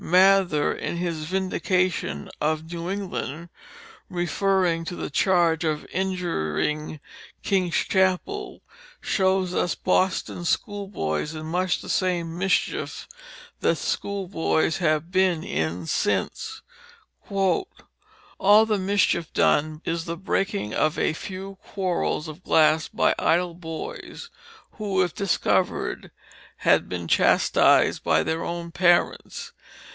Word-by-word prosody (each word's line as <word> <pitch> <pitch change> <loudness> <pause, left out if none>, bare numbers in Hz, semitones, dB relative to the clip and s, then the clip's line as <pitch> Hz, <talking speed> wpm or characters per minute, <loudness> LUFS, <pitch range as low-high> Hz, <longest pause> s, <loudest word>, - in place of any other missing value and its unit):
Mather, 185 -3 +4
in - - -4
his 170 -3 -3
Vindication 185 - -1
of 155 +2 -1
New 170 +1 -4
England, 175 -4 -4 0.6
referring 175 0 +1
to 175 - -5
the - - -5
charge 170 -1 +2
of 155 -2 -1
injuring 155 - -2 0.4
King's 185 -4 +1
Chapel, 190 - 0 0.4
shows 190 -2 +1
us 175 -2 0
Boston 185 -1 0
schoolboys 170 - -2
in 155 0 -6
much 180 +2 0
the - - -10
same 175 -3 0
mischief 190 +2 -1 0.5
that - - +2
schoolboys 180 -5 -1
have 155 -1 0
been 185 -3 +2
in 80 +3 -2
since: 215 - -1 0.7
"All 195 - +1 1.0
the 215 -2 0
mischief 190 -4 +1
done 155 +1 +2
is 165 0 -2
the 170 0 -4
breaking 195 - -1
of 155 0 +1
a - - +1
few 190 +3 -7
Quarels 180 -4 -2
of 155 +4 -10
Glass 155 0 +4
by - - +2
idle 175 +1 +2
Boys, 165 -2 -8 0.4
who 200 -4 0
if 175 - -3
discover'd 195 -3 0 0.5
had - - +3
been 85 -2 -4
chastis'd - - +4
by - - +3
their 160 +1 -2
own 170 0 -4
Parents. 175 0 +1
175 Hz, 110 wpm, -25 LUFS, 160-190 Hz, 1.0 s, Mather